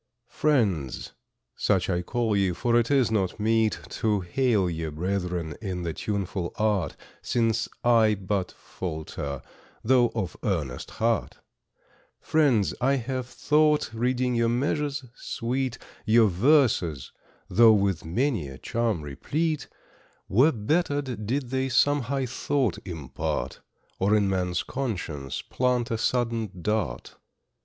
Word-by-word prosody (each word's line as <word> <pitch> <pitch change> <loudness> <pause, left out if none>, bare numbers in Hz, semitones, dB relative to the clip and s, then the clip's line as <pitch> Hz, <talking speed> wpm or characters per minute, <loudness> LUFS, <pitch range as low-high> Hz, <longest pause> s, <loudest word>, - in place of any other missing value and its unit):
Friends, 100 - 0 0.4
such 95 -4 +1
I 90 -2 0
call 115 +3 0
ye, 95 -2 +2
for 120 +7 0
it 120 -1 +3
is 135 -5 +3
not 100 -2 0
meet 110 0 +2 0.2
To 105 -3 +2
hail 105 +1 +1
ye 80 -1 -3
brethren 90 -1 -2
in 95 -4 -3
the 85 -2 -2
tuneful 95 -2 -3
art, 105 -5 +1 0.3
Since 115 -1 0
I 115 -3 +5
but 95 -1 -2
falter, 80 -5 -6 0.4
though 120 0 +4
of 95 -6 -2
earnest 80 - -2
heart, 115 0 -1 0.8
Friends, 135 -10 +2
I 135 +3 +3
have 130 0 -3
thought, 150 -1 +2
reading 125 +2 0
your 115 -1 +2
measures 140 +3 -1
sweet, 125 +1 -3 0.3
Your 110 0 +5
verses, 95 - +2 0.4
though 110 +4 +6
with 100 -5 +1
many 110 - 0
a 65 -1 -9
charm 115 - -1
replete, 150 - -2 0.6
Were 130 +10 +5
bettered 135 - -1
did 130 +1 -1
they 130 0 0
some 145 +3 +3
high 135 +2 -1
thought 125 -2 -1
impart, 75 -6 -4 0.4
Or 100 +3 +3
in 105 -2 +3
man's 90 -2 0
conscience 85 - -4
plant 125 -2 0
a 115 - 0
sudden 115 -3 0
dart. 95 - -2
110 Hz, 125 wpm, -26 LUFS, 90-125 Hz, 0.8 s, though